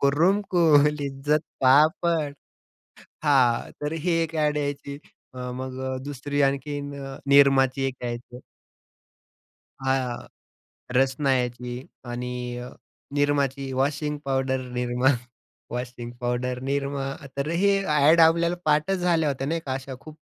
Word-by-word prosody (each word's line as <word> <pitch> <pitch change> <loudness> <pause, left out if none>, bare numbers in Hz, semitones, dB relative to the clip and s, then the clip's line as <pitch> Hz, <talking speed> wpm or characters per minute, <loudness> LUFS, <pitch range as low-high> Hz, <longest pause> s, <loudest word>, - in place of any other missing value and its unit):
"कुरुम 165 +9 +3
कुर 155 -5 +5
लिज्जत 145 +1 -1 0.2
पापड." 150 +3 +3 0.9
हां, 130 -5 +3
तर 150 +1 -2
ही 165 +2 -2
एक 165 0 -4
अ‍ॅड 150 -1 +1
यायची. 145 -1 -3 0.4
अ, 125 0 -5
मग 130 0 -6 0.2
अ, - - -3
दुसरी 145 0 -2
आणखीन 145 +1 -1
अ, 135 0 -7
निरमाची 135 -1 +5
एक 135 - -3
यायची. 120 +1 -6 1.4
हां, 130 -2 -1 0.7
रसना 135 +2 +2
यायची 125 +1 -4 0.2
आणि 125 0 -4
अ, 125 0 -7 0.5
निरमाची. 140 -2 0
Washing 145 +3 -1
powder 130 -1 0
Nirma, 125 +1 +1 0.6
washing 120 0 -5
powder 125 +1 -2
Nirma 140 0 -2 0.3
तर 140 +1 -1
हे 195 +4 +3
अ‍ॅड 150 +1 +4
आपल्याला 170 +2 +4
पाठच 155 +5 +2
झाल्या 170 -3 +2
होत्या 135 -1 -2
नाही 165 +3 -1
का, 130 - -2
अशा 135 0 -6
खूप 155 -1 -12
140 Hz, 125 wpm, -25 LUFS, 130-150 Hz, 1.4 s, कुर